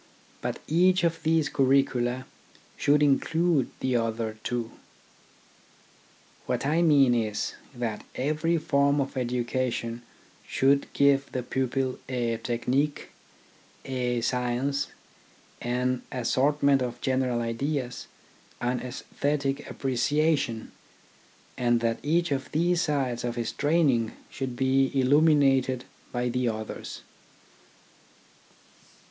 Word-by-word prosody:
But - - -2
each 180 +3 +3
of 165 -1 +1
these 160 -1 +2
curricula 130 -2 +1 0.5
should 150 +1 +3
include 160 +1 +2
the 130 -2 +1
other 115 -1 -2
two. 120 -2 -2 1.8
What - - -1
I 155 +4 +2
mean 140 -6 +5
is, 110 -3 -1 0.2
that 115 -3 -3
every 155 +5 0
form 140 -2 +2
of 140 0 -2
education 120 -1 -2 0.5
should 140 +1 +2
give 140 -1 +3
the 125 - -2
pupil 130 +1 -1
a 120 -3 -1
technique, 130 +6 -1 0.8
a 125 -2 -1
science, 125 +4 0 0.7
an 125 +1 0
assortment 135 +2 +2
of 120 -1 -3
general 130 -2 0
ideas, 125 +2 -3 0.5
and 125 +1 -1
aesthetic 140 +2 -2
appre 135 -1 -3
ciation, 140 -3 +1 0.9
and 120 -1 +3
that 115 -1 0
each 170 +2 +1
of 135 -1 -2
these 170 +2 +2
sides 135 -7 -1
of 120 -1 -2
his 120 -1 -2
train 160 +2 +2
ing 115 -2 -1 0.2
should 130 -2 -4
be 135 +1 +2
illuminated 135 -2 +3 0.3
by 125 0 -1
the 125 0 0
others. 110 -1 -6
130 Hz, 105 wpm, -27 LUFS, 120-145 Hz, 1.8 s, mean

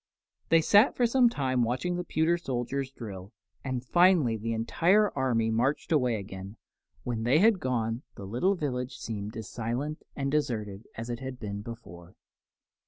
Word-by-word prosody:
They 165 0 +6
sat 205 - +5
for 245 - +3
some 245 +1 +4
time 130 - 0
watching 130 +10 0
the 180 - -2
pewter 160 0 +1
soldiers 135 -3 -3
drill, 100 -5 -9 0.3
and 130 -2 -3
finally 175 -7 +4
the 115 +1 -3
entire 175 - +3
army 120 -4 +1
marched 130 +9 0
away 125 -7 +3
again. 100 0 -7 0.5
When 120 -3 -3
they 120 +6 +3
had 210 +2 +5
gone, 120 -4 -1
the 100 - -8
little 125 - +1
village 130 -5 -3
seemed 105 0 -5
as 110 -2 -6
silent 125 +7 -3
and 140 -1 -2
deserted 110 -8 -2
as 115 +2 -5
it 120 - -4
had 130 -1 -6
been 100 -1 -5
before. 95 -6 -10
125 Hz, 165 wpm, -29 LUFS, 110-155 Hz, 0.5 s, They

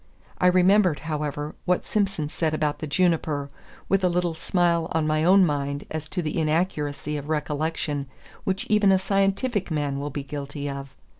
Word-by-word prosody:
I 180 - +4
remembered, 180 -2 +4
however, 150 -1 -3
what 180 0 +1
Simson 195 -7 0
said 155 +1 -1
about 150 -1 -1
the 155 - -4
juniper, 155 -4 +1 0.4
with 195 -1 +2
a 180 - +4
little 175 -1 0
smile 170 0 +1
on 160 -1 +1
my 155 0 +1
own 190 +2 +6
mind 140 -2 -2
as 155 0 -4
to 180 0 -2
the 155 +2 -2
inaccuracy 150 -3 -1
of 145 +1 -7
recollection 150 -1 -1 0.4
which 190 0 -1
even 210 -2 +4
a 190 - +5
scientific 195 +3 0
man 145 -3 -1
will 145 +1 -3
be 145 0 -5
guilty 145 +1 -5
of. 140 -1 -6
155 Hz, 170 wpm, -25 LUFS, 145-180 Hz, 0.4 s, own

